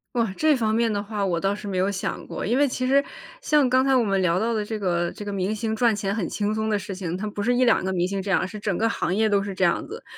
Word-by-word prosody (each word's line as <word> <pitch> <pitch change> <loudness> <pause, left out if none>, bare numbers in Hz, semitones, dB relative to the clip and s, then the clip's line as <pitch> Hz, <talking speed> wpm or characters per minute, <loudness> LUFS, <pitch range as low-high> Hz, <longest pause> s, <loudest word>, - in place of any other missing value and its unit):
哇， 225 -5 0
这 310 -2 +3
方 220 -3 0
面 230 0 +2
的 205 - -1
话 205 0 -3
我 175 -3 0
倒 195 +3 0
是 205 0 -7
没 190 -2 -2
有 185 +2 +2
想 200 -2 -4
过。 - - -5
因 235 +6 +1
为 290 - +4
其 255 -1 -3
实 275 +2 +3 0.4
像 295 -4 +3
刚 260 +1 +4
才 270 0 +3
我 255 - +4
们 195 -3 +1
聊 180 -1 +2
到 230 +2 0
的 215 -2 -1
这 220 +1 -4
个 175 -4 -1
这 210 - -8
个 205 - -4
明 195 +2 -1
星 220 0 -2
赚 230 -1 +3
钱 200 -1 -2
很 205 -5 -2
轻 210 0 -1
松 220 0 -1
的 215 - +2
事 200 0 -5
情， 180 -2 -4
他 210 +3 -4
不 205 - -6
是 240 +4 +2
1-2 245 -4 +3
个 190 - -1
明 180 -1 0
星 195 0 -2
这 195 - -6
样， 195 - +3
而 - - -1
是 210 +3 -8
整 205 -3 -2
个 225 - +1
行 185 -5 -1
业 220 +2 +2
都 200 -1 +2
是 195 0 -4
这 185 - -4
样 170 - +1
子。 445 +4 -8
210 Hz, 340 characters per minute, -24 LUFS, 195-230 Hz, 0.4 s, 为